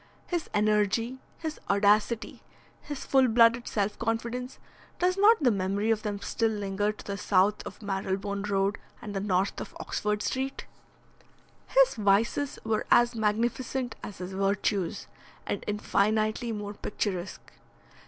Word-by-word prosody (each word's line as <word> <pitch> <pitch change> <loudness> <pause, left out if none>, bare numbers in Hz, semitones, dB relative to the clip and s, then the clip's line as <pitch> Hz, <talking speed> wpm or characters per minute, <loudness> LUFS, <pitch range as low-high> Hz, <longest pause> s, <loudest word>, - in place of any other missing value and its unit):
His 345 -3 -3
energy, 215 +4 +1 0.2
his 315 -2 -5
audacity, 210 +3 +2 0.4
his 290 -2 -6
full 265 -1 +4
blooded 230 +1 +4
self 205 -1 -1
confidence 235 +3 -2 0.4
does 360 +1 +2
not 410 -2 +5
the 245 - +5
memory 200 +2 0
of 220 -1 +1
them 205 -2 -3
still 225 +2 0
linger 205 -1 -1
to 210 - -13
the 200 -1 -4
south 200 +2 +3
of - - -10
Marylebone 195 0 -2
Road 195 +1 +1 0.2
and 210 - -7
the - - 0
north 195 0 0
of - - -8
Oxford 210 0 -2
Street? 265 +1 -2 1.0
His - - +5
vices 215 +7 +1
were 220 -1 0
as 240 0 +5
magnificent 235 +3 -1
as 205 - -8
his 185 +1 -6
virtues, 195 -1 0 0.4
and - - -3
infinitely 215 +2 +1
more 205 -1 -4
picturesque. 200 -3 -4
210 Hz, 135 wpm, -28 LUFS, 200-235 Hz, 1.0 s, not